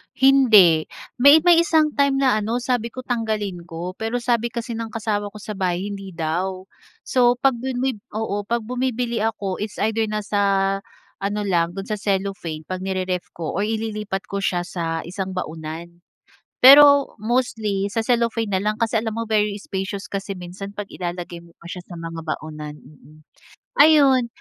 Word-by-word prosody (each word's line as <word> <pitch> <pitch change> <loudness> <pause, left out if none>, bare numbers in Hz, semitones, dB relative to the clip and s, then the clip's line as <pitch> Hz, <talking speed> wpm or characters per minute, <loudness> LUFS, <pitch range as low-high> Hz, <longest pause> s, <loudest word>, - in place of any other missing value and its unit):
Hindi, 220 -12 +6 0.3
may 285 +5 +7
may 350 -1 +6
isang 320 -2 +3
time 275 -1 +3
na 255 -5 +3
ano 230 +3 -2
sabi 245 -3 0
ko 255 +2 -7
tanggalin 215 -7 -3
ko 175 +2 -7
pero 230 +2 -2
sabi 235 -1 +1
kasi 235 0 -5
ng 230 0 -3
kasama 215 -2 -2
ko 205 0 -10
sa 210 -1 -6
bahay 185 +1 -1
hindi 195 -2 -8
daw. 180 +4 -2 0.4
So 245 -1 +3
'pag 270 -3 +3
bumi 255 -1 -2 0.2
oo 205 -2 -3
pag 235 0 -1
bumibili 245 0 -2
ako 210 -4 -2
it's 210 0 -5
either 220 +1 +1
nasa 210 -1 -2 0.8
ano 205 +1 -2
lang 175 -3 0
do'n 195 +2 -7
sa 210 - -1
cellophane 195 -6 -2
'pag 185 +4 -5
nire-ref 185 -1 -2
ko 170 +1 -4
or 205 - +1
ililipat 215 -3 -3
ko 200 - -2
siya 180 -3 0
sa 165 -2 -3
isang 185 +2 -5
baunan 165 0 -6 0.6
pero 280 +1 +8
mostly 215 -3 -1
sa 225 +2 -2
cellophane 230 -2 0
na 190 - +1
lang 210 +2 -1
kasi 225 0 0
alam 220 -1 -4
mo 230 - -2
very 210 -2 +1
spacious 195 0 -5
kasi 195 0 -4
minsan 185 +3 -8
'pag 205 -1 -6
ilalagay 175 -1 -5
mo 170 0 -19
pa 170 +1 -11
siya 180 - -6
sa 175 - -9
mga 165 0 -6
baunan, 155 -1 -5
mm. 155 +1 -18 0.6
Ayun. 280 -5 +6
205 Hz, 170 wpm, -22 LUFS, 185-235 Hz, 0.8 s, pero